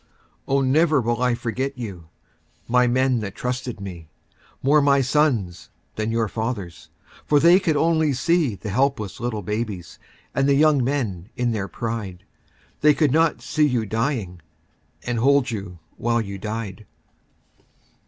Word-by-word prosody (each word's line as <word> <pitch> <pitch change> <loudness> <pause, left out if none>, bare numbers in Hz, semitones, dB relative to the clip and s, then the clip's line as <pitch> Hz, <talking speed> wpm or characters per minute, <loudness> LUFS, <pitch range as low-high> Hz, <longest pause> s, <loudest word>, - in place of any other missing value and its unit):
Oh, 135 0 +2
never 150 +3 +3
will 120 0 -1
I 125 -1 +2
forget 130 +4 -3
you, 95 -9 -7 0.6
My 125 +1 +3
men 130 0 +2
that 100 -3 -5
trusted 125 -2 -4
me. 90 -5 -8 0.5
More 145 +3 +5
my 140 -1 +4
sons 125 - 0 0.3
than 110 +1 -2
your 115 -1 +1
fathers'. 100 -8 -5 0.4
For 145 - +4
they 170 +4 +6
could 160 -6 0
only 160 -1 +2
see 155 - +1
The 100 - -18
little 105 - -2
helpless 130 -5 0 0.3
babies 105 -4 -4 0.3
And 135 +1 +1
the 140 - +4
young 150 -2 +4
men 115 -9 -2
in 120 -1 0
their 100 -3 -2
pride. 100 -2 -5 0.6
They 150 0 +5
could 150 -5 +2
not 160 +2 +2
see 155 -1 +2
you 120 -5 0
dying. 110 - -2 0.6
And 120 -2 -2
hold 140 +1 +3
you 100 -5 -6 0.2
while 120 0 +1
you 100 -3 -5
died. 110 -1 -5
120 Hz, 150 wpm, -23 LUFS, 105-140 Hz, 0.6 s, they